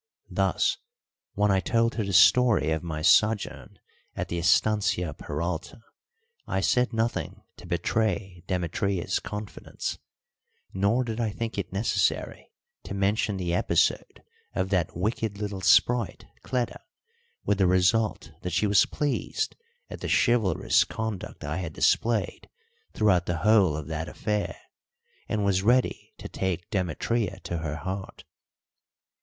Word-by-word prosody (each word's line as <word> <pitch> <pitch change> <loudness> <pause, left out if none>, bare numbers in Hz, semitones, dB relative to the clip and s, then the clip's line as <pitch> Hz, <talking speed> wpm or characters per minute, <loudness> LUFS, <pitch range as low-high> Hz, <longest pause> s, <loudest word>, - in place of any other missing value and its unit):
Thus, - - +1 0.6
when 105 0 +3
I 95 - +3
told 115 +3 +1
her 110 - -1
the 100 - -3
story 110 +1 +5
of 80 -1 0
my 80 -3 -5
sojourn 105 +4 +2 0.4
at - - -4
the 85 - -2
estancia 90 -2 +2
Peralta, 80 +8 -4 0.7
I - - 0
said 125 +6 +2
nothing 115 0 -2
to - - -12
betray 95 -5 -1
Demetria's 90 +1 -1
confidence; 105 0 -6 0.7
nor 100 +6 +2
did 115 -1 -4
I 115 -2 0
think 115 +2 -4
it 90 - -4
necessary 100 +4 -1 0.3
to 100 - -7
mention 100 +1 0
the 90 -2 -2
episode 90 - +1 0.3
of 95 0 -1
that 90 -5 0
wicked 105 +2 -2
little 100 -2 -4
sprite, 120 +3 +3 0.2
Cleta; 125 -2 -2 0.7
with 100 -1 +1
the 95 - +4
result 95 +4 +2
that 90 - -4
she 90 +4 +2
was 100 -2 +4
pleased 145 -2 -2 0.3
at - - -8
the - - -3
chivalrous 120 -6 +3
conduct 110 -4 -5
I 75 +4 -3
had 90 -4 -4
displayed 110 +2 +1 0.4
throughout 90 -5 +2
the 85 - -1
whole 100 -8 +4
of 75 - -5
that 80 +1 -3
affair, 105 -1 -2 0.7
and 105 -2 0
was 95 -2 +2
ready 125 +5 +1
to - - -8
take 90 -2 -3
Demetria 95 +3 -1
to 85 - -4
her 80 -2 -3
heart. 95 +4 -6
100 Hz, 135 wpm, -27 LUFS, 90-110 Hz, 0.7 s, story